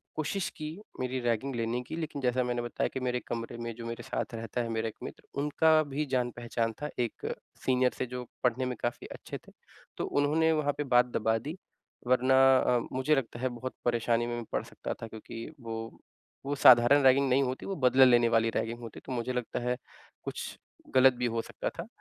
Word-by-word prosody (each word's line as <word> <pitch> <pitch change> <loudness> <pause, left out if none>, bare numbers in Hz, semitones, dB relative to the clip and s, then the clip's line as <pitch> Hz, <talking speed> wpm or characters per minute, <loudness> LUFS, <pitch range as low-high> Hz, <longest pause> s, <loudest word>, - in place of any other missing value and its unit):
कोशिश 155 +5 -1
की 155 - -4 0.3
मेरी 130 0 -1
रैगिंग 120 +2 -1
लेने 115 +1 -1
की 125 - -6
लेकिन 155 -3 -4
जैसा 125 0 +2
मैंने 120 -1 -1
बताया 120 0 -1
कि - - -2
मेरे 125 -1 -1
कमरे 115 0 -4
में 115 0 -4
जो 115 0 -8
मेरे 115 0 -5
साथ 130 - -3
रहता 115 +1 -3
है 115 - -3
मेरा 115 0 -1
एक 110 - -6
मित्र - - -8 0.2
उनका 150 +2 +3
भी 145 +1 -2
जान 125 -3 0
पहचान 115 -1 -2
था 150 - -2
एक 120 -3 -2 0.4
सीनियर 130 -1 +3
से - - -1
जो 125 0 -5 0.2
पढ़ने 125 +1 +2
में 125 0 -2
काफ़ी 120 0 -3
अच्छे - - -7
थे। - - -14 0.5
तो - - -1 0.2
उन्होंने 160 +3 +3
वहाँ 150 -2 +1
पे 145 - 0
बात 125 0 +6
दबा 110 -2 0
दी, 150 +10 -6 0.5
वरना 130 +1 +4 0.2
अ, 125 -1 +3
मुझे 130 +4 +2
लगता 120 -3 -3
है 130 +1 0
बहुत 130 +2 -5
परेशानी 120 -1 +2
में 120 - -2
मैं 120 -1 -5
पड़ - - 0
सकता - - -6
था 115 - -4
क्योंकि 110 +1 -8
वो 115 -1 -5 0.7
वो 140 +1 -1
साधारण 130 +1 +7
रैगिंग 135 +1 +5
नहीं 135 +2 +4
होती 130 0 -3
वो 195 - -3
बदला 130 -2 +6
लेने 120 -2 +5
वाली 115 0 +3
रैगिंग 115 +1 -1
होती। 115 -2 -9
तो - - -7
मुझे 125 0 -2
लगता 125 -2 -2
है 125 - 0 0.5
कुछ - - -5 0.4
गलत 130 0 +7
भी 125 0 -2
हो - - +2
सकता - - -4
था। - - -4
125 Hz, 215 wpm, -30 LUFS, 120-135 Hz, 0.7 s, साधारण